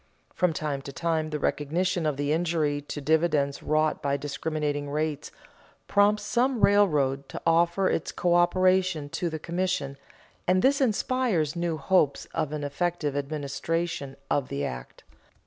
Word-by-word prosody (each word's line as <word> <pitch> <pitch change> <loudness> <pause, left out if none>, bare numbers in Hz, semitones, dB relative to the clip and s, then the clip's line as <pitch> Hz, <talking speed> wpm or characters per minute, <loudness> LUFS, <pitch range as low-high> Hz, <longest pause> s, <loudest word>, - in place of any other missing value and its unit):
From 180 -2 +2
time 150 -3 -3
to 140 - -8
time 160 +1 -1
the 150 - -2
recognition 165 +4 0
of 150 -3 -1
the 145 +1 0
injury 160 -3 0
to 145 +1 -6
dividends 150 -2 +1
wrought 155 0 +1
by 140 0 0
discriminating 145 0 -3
rates 150 0 -2 0.6
prompts 205 +1 +3
some 240 +3 +1
railroad 145 -10 +3
to - - -6
offer 170 +3 +3
its 160 - -1
coöperation 180 -2 +2
to 175 - -2
the 160 - -4
commission, 170 -4 -2 0.5
and 185 +1 +3
this 280 +2 +3
inspires 220 - +1
new 170 -2 -1
hopes 145 -2 +2
of 150 - -1
an 150 -1 -4
effective 150 0 -2
administration 145 +1 -3
of 140 -3 0
the 140 +1 -3
act. 60 -1 -7
155 Hz, 145 wpm, -27 LUFS, 145-180 Hz, 0.6 s, prompts